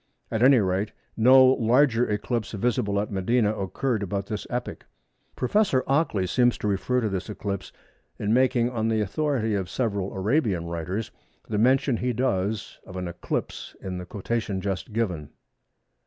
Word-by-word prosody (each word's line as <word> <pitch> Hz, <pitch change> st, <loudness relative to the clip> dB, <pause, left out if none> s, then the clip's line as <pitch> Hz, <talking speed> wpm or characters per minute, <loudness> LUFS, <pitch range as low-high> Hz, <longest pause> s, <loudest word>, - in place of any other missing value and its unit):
At 110 Hz, -, -1 dB
any 130 Hz, +1 st, +7 dB
rate 100 Hz, +1 st, 0 dB, 0.2 s
no 130 Hz, +3 st, +7 dB
larger 125 Hz, -1 st, +3 dB
eclipse 105 Hz, +2 st, -2 dB
visible 100 Hz, -2 st, 0 dB
at 105 Hz, -, -3 dB
Medina 105 Hz, +3 st, +1 dB
occurred 110 Hz, +4 st, -2 dB
about 100 Hz, 0 st, -2 dB
this 105 Hz, -1 st, -5 dB
epoch. 125 Hz, 0 st, -5 dB, 0.5 s
Prof. 205 Hz, -, +1 dB
Ockley 135 Hz, -, +1 dB
seems 120 Hz, +6 st, +2 dB
to -, -, -3 dB
refer 115 Hz, +6 st, 0 dB
to 110 Hz, -, 0 dB
this 95 Hz, 0 st, -3 dB
eclipse 100 Hz, -2 st, -4 dB, 0.5 s
in 105 Hz, +1 st, 0 dB
making, 125 Hz, -1 st, +3 dB
on 110 Hz, -2 st, -1 dB
the 110 Hz, -1 st, +1 dB
authority 115 Hz, +1 st, 0 dB
of 95 Hz, -3 st, -2 dB
several 100 Hz, -6 st, -1 dB
Arabian 105 Hz, -, +1 dB
writers, 85 Hz, +6 st, -4 dB, 0.4 s
the 105 Hz, -2 st, -1 dB
mention 130 Hz, +2 st, +3 dB
he 125 Hz, +1 st, -1 dB
does 110 Hz, -4 st, -1 dB
of 95 Hz, -, -11 dB
an 90 Hz, -1 st, -3 dB
eclipse 85 Hz, -, -4 dB
in 90 Hz, -1 st, -5 dB
the 90 Hz, -, -8 dB
quotation 105 Hz, 0 st, -2 dB
just 95 Hz, +3 st, -3 dB
given. 95 Hz, -10 st, -2 dB
110 Hz, 155 wpm, -25 LUFS, 100-125 Hz, 0.5 s, any